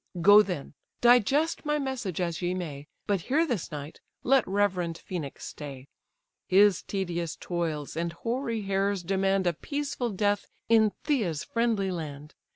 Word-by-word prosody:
Go 205 +4 +8
then—digest 240 - +1
my 300 -1 +1
message 255 - -3
as 170 -2 -2
ye 180 +1 0
may— 150 -5 -6 0.2
But 200 -3 0
here 300 - +2
this 235 - -3
night 145 0 -7 0.2
let 265 -1 +4
reverend 185 -4 0
Phœnix 160 -7 -5
stay: 140 -3 -8 0.6
His 200 -1 +5
tedious 175 -4 -3
toils 160 -5 -3
and 170 +1 -1
hoary 230 +4 -3
hairs 195 -1 0
demand 195 +1 +1
A 175 - +2
peaceful 275 - -3
death 205 0 0 0.2
in 220 -2 +5
Pythia's 210 - 0
friendly 225 -5 0
land. 150 -3 -6
195 Hz, 140 wpm, -28 LUFS, 170-230 Hz, 0.6 s, Go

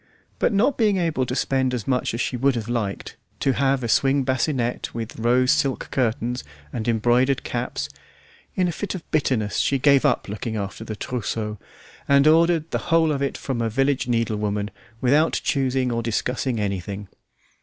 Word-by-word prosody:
But - - +2
not 225 +7 +2
being 210 -4 +3
able 160 -8 0
to 125 - -2
spend 130 -2 +1
as 115 - -5
much 125 -3 0
as 120 - -2
she 120 - -1
would 135 +2 +2
have 115 -2 -3
liked, 115 -5 -3 0.2
to 135 - +2
have 135 +1 +1
a - - -1
swing 135 +4 +3
bassinette 130 -3 -1
with 115 -1 -5
rose 125 +3 +3
silk 135 -2 0
curtains, 120 -1 -1 0.3
and 115 -1 -3
embroidered 120 +4 +2
caps, 120 - -3 0.7
in 185 -1 +2
a - - 0
fit 200 +4 -4
of 175 - -7
bitterness 125 -8 0
she 140 - +2
gave 140 0 +4
up 140 -5 +1
looking 105 +2 -4
after 100 +1 -4
the 110 -1 -5
trousseau, 110 -3 -3 0.5
and 140 0 +5
ordered 165 +1 +4
the - - 0
whole 165 -1 +4
of 140 -2 -1
it 140 - -1
from 130 -4 -3
a 115 - 0
village 135 +4 +1
needlewoman, 105 -3 -1 0.3
without 145 +5 +3
choosing 130 -2 +1
or 115 0 -1
discussing 120 +2 -1
anything. 100 0 -3
125 Hz, 175 wpm, -23 LUFS, 115-140 Hz, 0.7 s, and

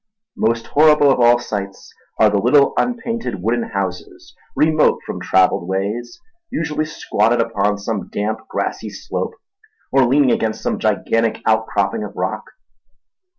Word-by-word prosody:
Most 115 +1 0
horrible 150 -1 +5
of 130 - +1
all 120 0 +6
sights 100 -5 -6 0.3
are 110 -1 +5
the 100 - +2
little 140 +6 +4
unpainted 230 - -2
wooden 120 +3 +1
houses 95 -5 -5 0.2
remote 155 0 +3
from - - -6
travelled 90 -2 +2
ways, 100 - -3 0.3
usually 155 -1 -2
squatted 120 -6 0
upon 105 -3 0
some 100 -1 -4
damp, 105 +2 -2
grassy - - -3
slope - - -5 0.6
or 135 -1 +4
leaning 135 0 +3
against 110 -1 -1
some - - -1
gigantic 115 0 0
outcropping 105 -2 0
of 105 - -8
rock. - - -3
115 Hz, 135 wpm, -19 LUFS, 100-135 Hz, 0.6 s, all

